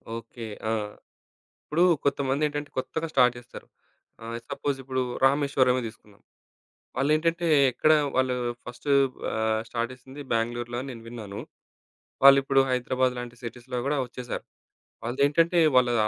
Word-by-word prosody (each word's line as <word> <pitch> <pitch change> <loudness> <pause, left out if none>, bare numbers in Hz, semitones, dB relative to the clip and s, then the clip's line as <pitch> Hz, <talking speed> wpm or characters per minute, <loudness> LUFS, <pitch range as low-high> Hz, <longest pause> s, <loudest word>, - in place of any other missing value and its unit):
Okay. 115 0 -8 0.2
ఆ! - - +1 0.9
ఇప్పుడు 165 +4 +1 0.2
కొంతమందేంటంటే, 145 +1 0
కొత్తగా 160 +5 -2
స్టార్ట్ 125 -2 +5
చేస్తారు. 120 - -12 0.6
ఆహ్, 115 +1 -5
సపోజిప్పుడు 135 -2 -2 0.2
రామేశ్వరమే 135 -2 +3
తీసుకుందాం. 105 -2 -15 0.8
వాళ్ళేంటంటే, 155 +5 +1 0.3
ఎక్కడ 155 +5 +3 0.2
వాళ్ళు 130 -1 +2 0.3
ఫస్టు 120 +4 -6 0.4
ఆహ్, 110 0 0
స్టార్ట్ 120 +1 -2
చేసింది 130 +3 -11
బ్యాంగ్‌లూ‌ర్‌లో 120 +1 -1
అని 140 - -6
నేను 115 - -10
విన్నాను. 110 -4 -7 0.8
వాళ్ళు 140 0 +9
ఇప్పుడు 135 0 +4
హైదరాబాద్ 125 0 +1
లాంటి 120 0 -7
సిటీస్‌లో 125 +2 -6
కూడా 150 - +1
వచ్చేసారు. 125 0 -6 0.6
వాళ్ళదేంటంటే, 145 +8 +2 0.2
వాళ్ళు 125 -1 +4
130 Hz, 115 wpm, -26 LUFS, 120-140 Hz, 0.9 s, వాళ్ళు